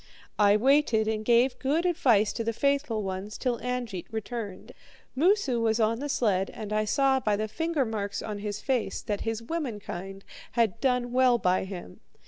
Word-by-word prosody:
"I 205 0 +5
waited 240 -3 +3
and 215 -1 -1
gave 245 +3 +3
good 300 +6 0
advice 245 - +3
to 230 - -3
the 230 0 -1
faithful 280 -4 0
ones 195 +2 -5
till 245 -3 -1
Angeit 245 -7 -4
returned. 220 -3 -6 0.4
Moosu 295 - +2
was 225 0 +1
on 225 +1 +2
the 290 +1 -4
sled, 195 -8 +1
and 215 -1 -5
I 215 0 +1
saw 270 +4 +2
by 210 -5 +1
the 215 +1 -2
fingermarks 220 -7 -2
on 210 -2 -5
his 205 0 -4
face 260 -4 -1
that 205 -3 -3
his 225 0 -3
womankind 205 - -5 0.3
had 230 -2 +1
done 250 -2 +1
well 250 -1 +4
by 185 -3 +1
him. 185 - -8
225 Hz, 170 wpm, -27 LUFS, 210-260 Hz, 0.4 s, I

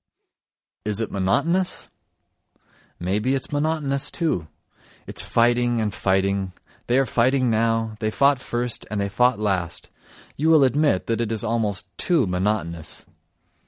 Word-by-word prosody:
Is 105 0 0
it 115 - -3
monotonous? 145 - 0 1.1
May 95 +4 0
be 130 +5 +1
it's 135 - -4
monotonous 145 -2 0
too: 150 - -1 0.6
it's - - -2
fighting 120 0 +2
and 105 -3 -1
fighting; 95 0 0 0.3
they 120 - +2
are 135 - +3
fighting 125 +1 +2
now, 115 0 0
they 110 - 0
fought 140 +6 +3
first 120 -1 -2
and 105 - -2
they 100 0 -1
fought 125 +4 +2
last—you 100 - -4
will 155 -3 +6
admit, 135 -6 +2
that 115 0 -1
it 115 -1 -2
is 110 0 0
almost 110 -3 -2
too 170 -8 +2
monotonous. 90 -3 -2
115 Hz, 135 wpm, -23 LUFS, 100-135 Hz, 1.1 s, will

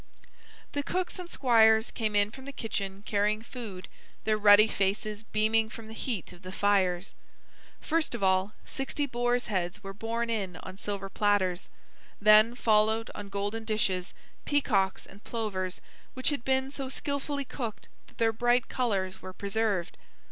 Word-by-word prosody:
The 285 - -1
cooks 365 +5 -2
and 355 -1 -7
squires 220 -5 +4
came 215 -3 -2
in 205 0 +3
from 265 +2 -11
the 280 - -6
kitchen 200 -6 -4
carrying 210 +1 +1
food, 225 -7 -8 0.4
their 215 - +2
ruddy 210 0 +7
faces 205 +1 -1
beaming 220 0 +1
from 225 0 -10
the 220 - -9
heat 225 -4 -3
of 175 - -16
the 185 0 -8
fires. 190 -2 +1 0.7
First 320 -5 0
of 215 - -4
all, 190 +2 +2
sixty 285 +1 -2
boars' 245 -1 0
heads 185 -2 -2
were 195 0 -6
borne 230 +3 -2
in 195 -6 -2
on 190 +1 -9
silver 200 -1 -4
platters. 195 -3 +1 0.5
Then 215 +3 +6
followed, 220 -1 +2
on 200 - -7
golden 205 +3 -3
dishes, 195 -4 -1 0.3
peacocks 205 -10 +1
and 200 +2 -15
plovers 190 -5 -3 0.3
which 260 +3 +1
had 285 -5 -2
been 265 +1 +1
so 275 -2 -4
skillfully 280 +1 -2
cooked 235 -4 -5 0.2
that - - -21
their 225 -1 +2
bright 240 +2 +2
colors 195 -7 -1
were 185 - -8
preserved. 200 -2 -1
215 Hz, 155 wpm, -29 LUFS, 195-240 Hz, 0.7 s, ruddy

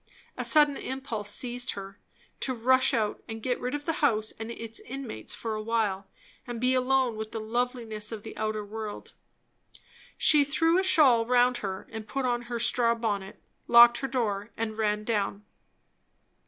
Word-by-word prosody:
A - - -3
sudden 295 -2 +4
impulse 240 -6 -5
seized 245 +3 -2
her, 195 0 -9 0.4
to 260 - -2
rush 260 +3 +3
out 220 -4 -1
and 225 -2 -7
get 250 -1 -1
rid 250 +3 -3
of 290 0 -6
the 325 - 0
house 220 -7 +2
and 225 0 -8
its 230 -1 -7
inmates 255 - -7
for 225 -1 -4
a 215 - -3
while, 215 -4 -1 0.4
and 240 -1 -5
be 255 +2 +2
alone 255 -2 +1
with 220 0 -5
the 225 - -4
loveliness 230 -1 -2
of 215 -2 -6
the 220 - -9
outer 215 -1 -2
world. 215 0 -7 1.0
She 300 -2 +5
threw 325 +5 +2
a - - +1
shawl 260 -11 +5
round 245 0 +3
her, 190 -2 -5 0.2
put 270 +2 -2
on 240 -1 0
her 240 - -2
straw 235 0 +3
bonnet, 205 -4 -3 0.3
locked 235 0 +8
her 270 - -2
door, 225 -5 -2
and 220 -1 -3
ran 210 -1 0
down. 210 -2 -2
230 Hz, 170 wpm, -28 LUFS, 215-255 Hz, 1.0 s, locked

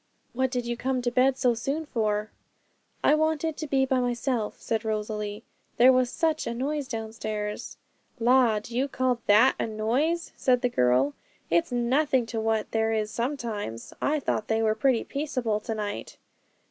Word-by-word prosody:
What 260 +2 +1
did 250 -2 -2
you 240 0 -2
come 255 +1 -1
to 240 - 0
bed 255 +2 +3
so 250 -3 +3
soon 275 +7 -3
for?' 215 -5 -1 0.7
'I - - +5
wanted 315 0 +1
to 310 - -4
be 270 -1 +2
by 260 -1 +1
myself,' 245 -2 -1
said 225 -1 -2
Rosalie; 210 -1 -3 0.3
'there 255 +2 +7
was 255 -1 +2
such 320 +1 0
a 235 - -2
noise 280 +3 -2
downstairs.' 220 -3 -5 0.4
'La! 240 -2 +4
do 225 +3 -7
you 265 +3 +1
call 255 -3 0
that 220 +6 +6
a - - 0
noise? 250 +11 0
said 250 -2 +2
the 250 - +3
girl; 130 - +2 0.4
'it's 170 +6 +2
nothing 255 +2 +2
to 230 0 -4
what 220 -1 0
there 225 0 +1
is 215 -1 -1
sometimes; 230 - -4
I 305 +1 +1
thought 215 -5 -2
they 220 0 +1
were 215 -1 +3
pretty 235 +2 +2
peaceable 255 -7 -2
to 225 +1 -4
night.' 205 -1 -5
240 Hz, 170 wpm, -27 LUFS, 215-265 Hz, 0.7 s, there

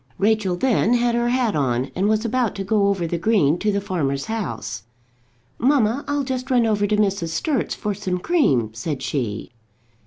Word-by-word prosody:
Rachel 205 -3 +1
then 235 +2 +2
had 240 0 +2
her 240 0 +1
hat 245 -3 +1
on, 130 -2 0
and 195 +3 +1
was 215 +1 +1
about 240 -1 0
to 195 - -3
go 200 0 +2
over 195 -4 0
the 170 +1 -2
green 175 -5 +2
to 210 - +1
the 200 - 0
farmer's 140 -8 -2
house. 115 - -4 0.8
"Mamma, 255 -1 +2
I'll 290 -1 0
just 260 -1 -4
run 245 -3 +3
over 205 -2 +1
to 210 +1 +1
Mrs. 195 -4 +1
Sturt's 240 - -1
for 210 - -3
some 190 -2 -3
cream," 175 - +1
said 135 +5 -4
she. 115 -8 -3
205 Hz, 185 wpm, -22 LUFS, 165-235 Hz, 0.8 s, run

